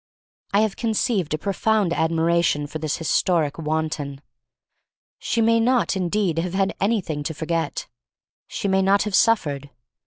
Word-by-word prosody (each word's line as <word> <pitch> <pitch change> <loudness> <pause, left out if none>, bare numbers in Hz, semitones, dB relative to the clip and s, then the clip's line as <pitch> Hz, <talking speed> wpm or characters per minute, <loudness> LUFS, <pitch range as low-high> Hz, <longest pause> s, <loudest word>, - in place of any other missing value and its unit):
I 200 - +3
have 215 -2 0
conceived 220 - 0
a - - -4
pro 200 +6 -3
found 210 -3 +1
admiration 165 -2 +1
for 155 +2 -6
this 155 -1 -2
historic 165 -2 +1
wan 160 0 0
ton. 140 -3 -6 1.0
She 230 - -1
may 230 +1 +4
not 240 -2 +2
indeed 180 -2 0
have 180 +2 -3
had 195 0 +1
anything 195 -8 0
to 155 +2 -4
forget; 165 0 -2 0.6
she - - -3
may 190 0 +2
not 195 +1 +3
have 210 - -4
suffered. 145 -12 +2
170 Hz, 155 wpm, -23 LUFS, 155-205 Hz, 1.0 s, may